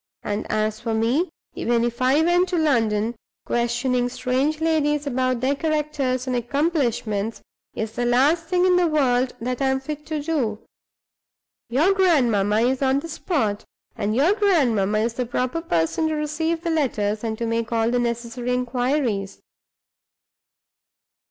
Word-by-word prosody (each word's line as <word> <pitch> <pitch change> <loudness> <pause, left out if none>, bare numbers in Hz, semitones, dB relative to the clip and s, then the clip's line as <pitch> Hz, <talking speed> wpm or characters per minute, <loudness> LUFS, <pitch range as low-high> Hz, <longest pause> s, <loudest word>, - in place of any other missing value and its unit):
And 205 0 -3
as 215 0 0
for 230 -2 -2
me 245 +11 +1 0.2
(even 235 0 0
if 240 +1 -2
I 265 +5 +4
went 355 +2 +3
to 355 - 0
London), 230 -7 +1 0.3
questioning 245 +1 0
strange 265 +5 -1
ladies 300 -2 +1
about 255 -2 0
their 265 +2 +2
characters 295 -5 -1
and 255 -1 -1
accomplishments 240 -5 -1 0.3
is 220 0 -3
the 240 +2 -2
last 285 +8 +3
thing 360 +1 +2
in 365 -1 +4
the 355 -1 +3
world 260 -5 +1
that 250 +3 -3
I 270 - +2
am 265 0 +1
fit 300 +2 -7
to 310 -1 -2
do. 285 -9 -1 1.1
Your 305 +11 +3
grandmamma 235 - +3
is 255 +3 +1
on 270 0 +2
the 330 - -8
spot; 275 - -1 0.3
and 215 -1 -1
your 300 +10 +4
grandmamma 255 - +2
is 225 +2 0
the 250 +1 -2
proper 255 +7 -1
person 170 - 0
to 315 - -1
receive 320 +2 -1
the 335 - -1
letters, 220 -9 0
and 220 -1 -2
to 235 - -2
make 230 0 -2
all 230 0 +1
the 245 - +1
necessary 240 +1 -2
inquires." 250 -4 -1
255 Hz, 155 wpm, -23 LUFS, 230-305 Hz, 1.1 s, I